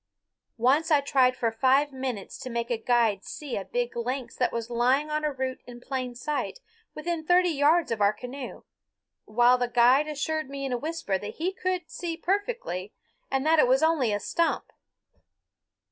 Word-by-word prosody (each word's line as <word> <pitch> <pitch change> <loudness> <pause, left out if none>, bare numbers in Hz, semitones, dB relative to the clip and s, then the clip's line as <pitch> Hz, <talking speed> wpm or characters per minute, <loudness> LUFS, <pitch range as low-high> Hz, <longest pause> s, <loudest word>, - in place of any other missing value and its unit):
Once 275 +8 +3
I 300 -3 +5
tried 260 -2 +2
for 230 -3 0
five 265 +5 +3
minutes 260 -6 -5
to 255 - -6
make 235 0 -3
a 235 - +1
guide 225 -4 +2
see 290 -4 -6
a 195 - -3
big 240 +4 -2
lynx 245 +1 -3
that - - +1
was 230 0 -4
lying 260 +6 +2
on 305 0 -1
a 300 - +1
root 260 -1 -4
in 240 -1 -10
plain 255 -1 -4
sight 295 - -3 0.4
within 330 +1 -3
thirty 355 +2 +4
yards 310 +2 +3
of 225 -2 -1
our 200 0 +5
canoe, 250 +5 -8 0.6
while 240 +3 +4
the 245 - +1
guide 250 +5 +4
assured 310 0 -2
me 275 0 -5
in 265 - -2
a - - +1
whisper 310 -11 -2
that 205 - -7
he 360 +4 -2
could 370 -2 -2
see 335 -2 -4
perfectly 395 - -2 0.3
and 270 +1 0
that 320 0 +4
it 250 - +5
was 260 +4 +3
only 310 -8 +3
a 205 - 0
stump. 335 +9 -1
265 Hz, 185 wpm, -27 LUFS, 240-310 Hz, 0.6 s, I